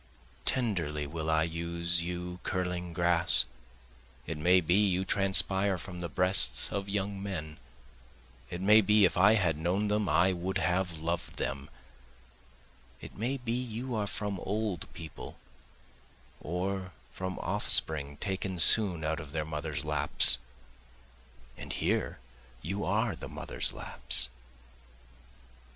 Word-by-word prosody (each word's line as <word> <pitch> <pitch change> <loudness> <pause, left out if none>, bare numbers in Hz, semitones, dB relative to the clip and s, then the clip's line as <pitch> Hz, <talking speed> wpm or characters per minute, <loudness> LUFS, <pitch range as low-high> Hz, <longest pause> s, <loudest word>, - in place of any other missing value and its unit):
Tenderly 85 - -1
will 80 +2 -4
I 80 0 +3
use 85 +1 0
you 90 +1 -5
curling 90 -1 -3
grass, 85 -5 +6 0.8
It 80 - -4
may 90 +4 +5
be 85 0 0
you 95 -2 +2
transpire 95 0 +3
from 90 +1 -8
the 85 -1 -4
breasts 90 +4 +2
of 100 0 -3
young 100 0 -2
men, 80 -6 -5 0.9
It 85 - -5
may 105 +3 +6
be 105 0 +5
if - - +1
I 100 +5 +6
had 85 -7 +1
known 95 +6 0
them 105 -2 0
I 85 +5 +3
would 90 +2 -2
have 90 -1 0
loved 85 +2 -3
them, 70 +2 -4 1.3
It - - -11
may 125 +6 -2
be 125 -3 -4
you 125 +1 -3
are 105 -2 -1
from 100 -2 -3
old 105 -1 -3
people, 80 -4 -9 1.0
or 90 +2 -3 0.2
from 95 0 -5
offspring 70 -2 0
taken 95 0 -3
soon 90 -3 +5
out 80 +1 -1
of 75 -2 -9
their 75 -1 -2
mothers' 75 -1 -4
laps, - - +3 1.2
And - - -7
here - - -1 0.5
you 95 +5 -3
are - - 0
the - - -9
mothers' - - -4
laps. 60 - -1
90 Hz, 130 wpm, -30 LUFS, 85-100 Hz, 1.3 s, grass